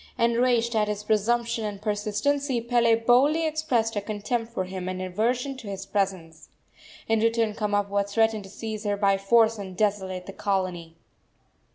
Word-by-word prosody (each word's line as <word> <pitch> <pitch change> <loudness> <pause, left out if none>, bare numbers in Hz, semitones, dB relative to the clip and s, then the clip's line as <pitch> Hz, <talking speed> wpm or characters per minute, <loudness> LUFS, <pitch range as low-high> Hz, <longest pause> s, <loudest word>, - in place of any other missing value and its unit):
Enraged 235 0 +2
at 210 -1 +2
his 210 0 -3
presumption 230 +2 +1
and 205 -2 -4
persistency, 220 +6 -1
Pele 235 -1 +3
boldly 260 +8 +3
expressed 300 -8 0
her 205 - -1
contempt 220 +3 -3
for 210 -5 -2
him 185 0 -5
and 185 0 -4
aversion 235 +9 -1
to 235 -5 -10
his 195 -1 -5
presence. 185 -6 -3 0.6
In 225 0 +2
return 225 -1 +1
Kamapuaa 205 -1 0
threatened 220 -1 +1
to - - -11
seize 215 +1 -6
her 205 -1 -1
by 195 -1 +2
force 225 +2 +3
and 190 -2 -7
desolate 190 -3 -1
the 195 - -8
colony. 180 -5 -2
215 Hz, 160 wpm, -26 LUFS, 195-235 Hz, 0.6 s, Pele